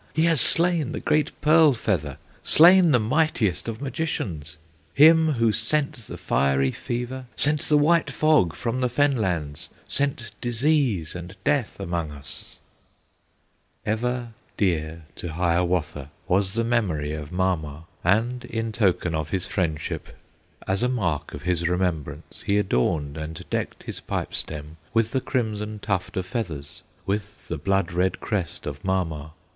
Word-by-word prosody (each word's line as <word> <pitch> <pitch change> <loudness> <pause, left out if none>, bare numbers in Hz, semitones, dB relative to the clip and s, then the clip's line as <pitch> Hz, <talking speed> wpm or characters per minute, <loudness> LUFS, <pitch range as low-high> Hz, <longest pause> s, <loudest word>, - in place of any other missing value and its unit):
He 160 - +3
has 165 -5 +3
slain 165 -4 +2
the - - -3
great 150 0 +1
Pearl 155 -1 +6
Feather, 80 - -2 0.2
Slain 175 +2 +7
the 135 - +5
mightiest 115 - +1
of 115 +4 -5
Magicians, 95 - -3 0.4
Him, 160 +1 +7
who 115 -3 +2
sent 140 +8 +1
the - - -7
fiery 70 -1 +1
fever, 125 +2 -4
Sent 150 +1 +3
the 150 - +5
white 165 +3 +3
fog 150 - +3
from 125 +2 -2
the 125 - +2
fen 145 +3 +2
lands, 85 -9 -2 0.2
Sent 130 -6 0
disease 120 - +1
and 90 +2 -8
death 140 -5 0
among 85 -2 -2
us!" 70 -2 -7 1.3
Ever 120 +2 -1 0.3
dear 80 -4 0
to 85 -3 -5
Hiawatha 85 -4 0 0.2
Was 95 +1 +2
the 115 - +1
memory 90 -11 0
of 75 0 -6
Mama! 85 -5 -1 0.2
And 115 +7 +1
in 115 0 -3
token 95 -6 +1
of 80 -1 -2
his 90 +1 -1
friendship, 80 -5 -3 0.5
As 95 +1 0
a 125 - +2
mark 90 - -1
of 75 - -9
his 85 -1 0
remembrance, 80 -4 -2
He 100 0 +3
adorned 75 -4 0
and 80 +1 -6
decked - - -3
his - - -5
pipe - - -4
stem 75 +1 -3 0.2
With 115 0 +2
the 130 - 0
crimson 110 -4 -2
tuft 100 -3 -2
of 95 - -1
feathers, 85 - -5 0.2
With 100 +1 -4
the 85 - -3
blood 95 +1 +1
red 90 +2 0
crest 95 -5 -3
of 75 0 -6
Mama. 80 -5 -2
100 Hz, 150 wpm, -25 LUFS, 80-125 Hz, 1.3 s, Slain